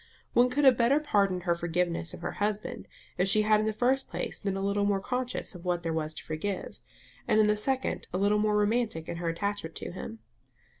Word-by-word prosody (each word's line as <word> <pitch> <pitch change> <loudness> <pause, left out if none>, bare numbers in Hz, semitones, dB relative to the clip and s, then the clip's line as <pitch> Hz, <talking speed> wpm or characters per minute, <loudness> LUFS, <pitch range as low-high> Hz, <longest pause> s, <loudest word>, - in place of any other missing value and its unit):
One 245 +1 +5
could 285 +3 +1
have 255 -3 +6
better 250 +5 +4
pardoned 200 - +1
her 175 -2 +2
forgiveness 170 -1 -1
of - - -9
her - - -2
husband 215 +3 -2 0.3
if 180 - +3
she 215 +2 +4
had 215 0 +4
in 215 - 0
the - - +2
first 255 +5 +1
place - - -4
been 195 -1 -2
a 195 - -2
little 200 +1 +1
more 200 -1 +2
conscious 250 +3 -3
of 175 -2 -11
what 175 -1 -1
there 165 -1 -1
was 155 -1 -2
to - - -8
forgive; 180 +5 -4 0.5
and 215 - +4
in 215 - +6
the 210 0 +3
second, 260 +5 -1
a 180 - -1
little 205 +2 +3
more 210 0 +2
romantic 210 -5 0
in 170 - -4
her 170 0 -2
attachment 200 -1 -3
to - - -5
him. 145 -10 -7
205 Hz, 230 wpm, -29 LUFS, 175-220 Hz, 0.5 s, have